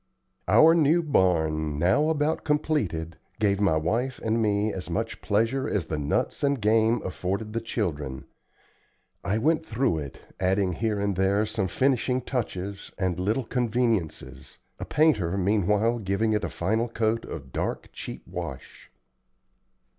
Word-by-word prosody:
Our 155 Hz, -, +7 dB
new 165 Hz, +1 st, +3 dB
barn, 80 Hz, -, +1 dB
now 110 Hz, -, +3 dB
about 155 Hz, 0 st, 0 dB
completed, 105 Hz, -, -1 dB, 0.2 s
gave 100 Hz, -2 st, +2 dB
my 95 Hz, -6 st, +3 dB
wife 115 Hz, +12 st, -1 dB
and 115 Hz, +1 st, +1 dB
me 105 Hz, 0 st, +1 dB
as 90 Hz, -2 st, -6 dB
much 115 Hz, +7 st, -3 dB
pleasure 115 Hz, +6 st, 0 dB
as 95 Hz, -5 st, -1 dB
the 75 Hz, -2 st, -3 dB
nuts 75 Hz, -, -1 dB
and 140 Hz, -1 st, +2 dB
game 110 Hz, +2 st, +2 dB
afforded 95 Hz, +4 st, -3 dB
the 115 Hz, -, -1 dB
children. 75 Hz, -, -3 dB, 1.0 s
I 100 Hz, +2 st, 0 dB
went 155 Hz, +7 st, +2 dB
through 120 Hz, -, 0 dB
it, 70 Hz, -3 st, -8 dB, 0.2 s
adding 95 Hz, 0 st, +1 dB
here 105 Hz, +3 st, -1 dB
and 100 Hz, -1 st, 0 dB
there 100 Hz, +3 st, +2 dB
some 100 Hz, -3 st, -1 dB
finishing 130 Hz, +3 st, +1 dB
touches 100 Hz, -6 st, -4 dB
and 90 Hz, -2 st, -1 dB
little 110 Hz, +7 st, 0 dB
conveniences, 115 Hz, -, -2 dB, 0.2 s
a -, -, -4 dB
painter 105 Hz, -, +2 dB
meanwhile 105 Hz, +4 st, +2 dB
giving 110 Hz, +2 st, 0 dB
it 105 Hz, -1 st, 0 dB
a -, -, -1 dB
final 110 Hz, +2 st, 0 dB
coat 115 Hz, 0 st, 0 dB
of 70 Hz, -5 st, -8 dB
dark, -, -, -3 dB
cheap -, -, -7 dB
wash. -, -, -8 dB
105 Hz, 145 wpm, -26 LUFS, 90-120 Hz, 1.0 s, Our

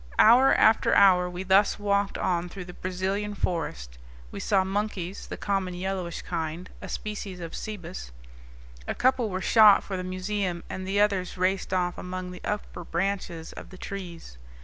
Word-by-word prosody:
Hour 250 Hz, +5 st, +7 dB
after 220 Hz, 0 st, +4 dB
hour 180 Hz, -2 st, +6 dB
we 180 Hz, +1 st, -5 dB
thus 190 Hz, +2 st, +4 dB
walked 200 Hz, -1 st, 0 dB
on 175 Hz, -1 st, -1 dB
through 185 Hz, 0 st, -8 dB
the 180 Hz, -, -10 dB
Brazilian 190 Hz, +3 st, -3 dB
forest. -, -, -3 dB, 0.3 s
We -, -, -6 dB
saw 195 Hz, -2 st, +2 dB
monkeys, 195 Hz, -1 st, -3 dB
the -, -, -6 dB
common 195 Hz, -3 st, -1 dB
yellowish 185 Hz, -2 st, -3 dB
kind, 165 Hz, +1 st, -4 dB
a -, -, -7 dB
species 205 Hz, -3 st, -5 dB
of 165 Hz, -2 st, -7 dB
cebus; 180 Hz, -, -6 dB, 0.8 s
a -, -, -2 dB
couple 255 Hz, -3 st, +2 dB
were 185 Hz, -1 st, -3 dB
shot 210 Hz, 0 st, +7 dB
for 195 Hz, -, -4 dB
the 185 Hz, -, -4 dB
museum 185 Hz, -1 st, -2 dB
and 185 Hz, 0 st, -5 dB
the 200 Hz, +1 st, +1 dB
others 195 Hz, -4 st, +1 dB
raced 185 Hz, +1 st, 0 dB
off 180 Hz, -1 st, 0 dB
among 180 Hz, 0 st, -5 dB
the 180 Hz, -, -10 dB
upper 210 Hz, -3 st, -4 dB
branches 175 Hz, -2 st, -3 dB
of -, -, -10 dB
the 185 Hz, -, -12 dB
trees. 175 Hz, -, -8 dB
185 Hz, 170 wpm, -27 LUFS, 180-200 Hz, 0.8 s, Hour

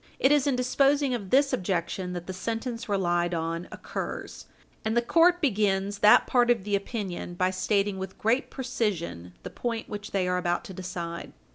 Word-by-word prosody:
445 265 Hz, -, +4 dB
It -, -, +7 dB
is 290 Hz, -1 st, +1 dB
in 275 Hz, -, +2 dB
disposing 275 Hz, +2 st, +2 dB
of 205 Hz, -6 st, -4 dB
this 275 Hz, +4 st, +4 dB
objection 180 Hz, 0 st, -2 dB
that 175 Hz, -1 st, -5 dB
the 185 Hz, -, -5 dB
sentence 230 Hz, +4 st, -4 dB
relied 175 Hz, -3 st, +1 dB
on 165 Hz, +1 st, -3 dB
occurs, -, -, -6 dB, 0.4 s
and 220 Hz, +2 st, 0 dB
the -, -, +5 dB
court 345 Hz, +7 st, +4 dB
begin 200 Hz, -, +1 dB
that 210 Hz, -, +7 dB
part 245 Hz, -1 st, +3 dB
of 235 Hz, -5 st, +3 dB
the 205 Hz, 0 st, 0 dB
opinion 195 Hz, -4 st, -4 dB
by 185 Hz, +1 st, +1 dB
stating 195 Hz, +1 st, 0 dB
with 190 Hz, 0 st, -6 dB
great 235 Hz, +5 st, +1 dB
precision 205 Hz, -, -3 dB
the -, -, -7 dB
point 230 Hz, -2 st, -3 dB
which 205 Hz, 0 st, -6 dB
they 190 Hz, -2 st, 0 dB
are 180 Hz, 0 st, +1 dB
about 175 Hz, 0 st, -1 dB
to 190 Hz, -, -9 dB
decide. 175 Hz, -2 st, -6 dB
200 Hz, 185 wpm, -27 LUFS, 180-240 Hz, 0.4 s, It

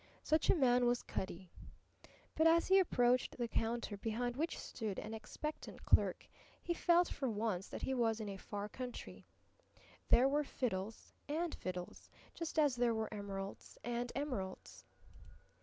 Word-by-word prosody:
Such 310 Hz, +1 st, +2 dB
a -, -, +7 dB
man 250 Hz, -5 st, +4 dB
was 240 Hz, 0 st, +1 dB
Cutty. 185 Hz, -1 st, -5 dB, 0.8 s
But 320 Hz, +1 st, +4 dB
as 335 Hz, +1 st, +5 dB
he 385 Hz, +1 st, +7 dB
approached 250 Hz, -8 st, +2 dB
the 240 Hz, -1 st, -1 dB
counter 225 Hz, -1 st, -1 dB
behind 235 Hz, +4 st, -2 dB
which 320 Hz, +5 st, -1 dB
stood 215 Hz, -5 st, -4 dB
an 220 Hz, -, -5 dB
expectant 235 Hz, +7 st, -6 dB
clerk -, -, +3 dB, 0.3 s
he 345 Hz, -, -1 dB
felt 345 Hz, +1 st, +4 dB
for 265 Hz, -3 st, -2 dB
once 210 Hz, -4 st, -1 dB
that -, -, -7 dB
he 265 Hz, -, 0 dB
was 230 Hz, -3 st, +1 dB
in 215 Hz, -, -4 dB
a 200 Hz, -, -4 dB
far 205 Hz, +1 st, -5 dB
country. 250 Hz, +3 st, -7 dB, 0.8 s
There 255 Hz, +3 st, +7 dB
were 290 Hz, +2 st, +2 dB
fiddles 220 Hz, -6 st, -3 dB, 0.2 s
and 325 Hz, +2 st, -1 dB
fiddles, 180 Hz, -1 st, -6 dB, 0.2 s
just 330 Hz, -1 st, -5 dB
as 290 Hz, -5 st, +4 dB
there 240 Hz, -1 st, +2 dB
were 220 Hz, 0 st, -2 dB
emeralds 200 Hz, -1 st, -6 dB
and 240 Hz, +1 st, -2 dB
emeralds. 250 Hz, -10 st, -4 dB
240 Hz, 155 wpm, -37 LUFS, 210-285 Hz, 0.8 s, a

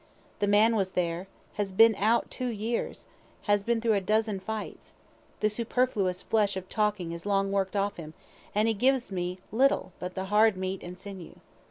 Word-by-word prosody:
The 205 Hz, -, +1 dB
man 215 Hz, +3 st, +5 dB
was 190 Hz, -3 st, -1 dB
there, 175 Hz, +1 st, -1 dB, 0.3 s
has 195 Hz, -2 st, -2 dB
been 225 Hz, +4 st, +6 dB
out 220 Hz, +3 st, +1 dB
two 255 Hz, -, -3 dB
years, 230 Hz, 0 st, -3 dB, 0.4 s
has 205 Hz, -1 st, +2 dB
been 230 Hz, +3 st, 0 dB
through 225 Hz, -1 st, +2 dB
a 200 Hz, -, +1 dB
dozen 215 Hz, +1 st, +1 dB
fights, 215 Hz, +2 st, -6 dB, 0.5 s
the 215 Hz, -, +4 dB
superfluous 215 Hz, -4 st, 0 dB
flesh 205 Hz, -3 st, +1 dB
of 185 Hz, -1 st, -6 dB
talking 210 Hz, -5 st, 0 dB
is 170 Hz, 0 st, -7 dB
long 195 Hz, -1 st, +1 dB
work'd 195 Hz, 0 st, 0 dB
off 200 Hz, 0 st, 0 dB
him, 155 Hz, -2 st, -9 dB, 0.4 s
and 210 Hz, +2 st, +3 dB
he 225 Hz, -, +3 dB
gives 250 Hz, +2 st, +1 dB
me 180 Hz, -1 st, -3 dB
little 255 Hz, -3 st, +2 dB
but 180 Hz, 0 st, -6 dB
the 190 Hz, 0 st, -3 dB
hard 215 Hz, -1 st, +5 dB
meat 190 Hz, 0 st, -3 dB
and 180 Hz, +1 st, -8 dB
sinew. 190 Hz, -3 st, -9 dB
205 Hz, 185 wpm, -28 LUFS, 190-220 Hz, 0.5 s, been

